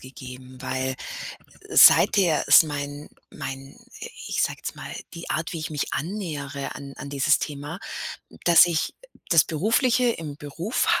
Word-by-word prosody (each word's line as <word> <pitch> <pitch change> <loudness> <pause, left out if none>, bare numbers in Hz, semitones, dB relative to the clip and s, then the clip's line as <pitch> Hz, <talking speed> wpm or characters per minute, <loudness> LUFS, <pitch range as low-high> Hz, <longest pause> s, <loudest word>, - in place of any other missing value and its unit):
gegeben, 130 0 -11
weil 130 0 -2 0.7
seither 180 -6 +6
ist - - +8
mein 145 -1 -6 0.2
mein 135 +1 -8 0.5
ich - - -1
sage - - 0
jetzt - - -5
mal, - - -8 0.2
die 170 0 -8
Art, 165 +1 -2
wie 170 - -4
ich 160 +1 -5
mich 150 -2 -3
annähere 150 -7 -4
an 140 0 -9
an 140 - -8
dieses 140 +1 +2
Thema, 150 +5 -6 0.6
dass 175 0 +7
ich 165 -2 -1 0.4
das 165 -3 +6
Berufliche 235 - +2
im 155 -9 -6
Beruf 160 - -1
150 Hz, 140 wpm, -24 LUFS, 140-170 Hz, 0.7 s, ist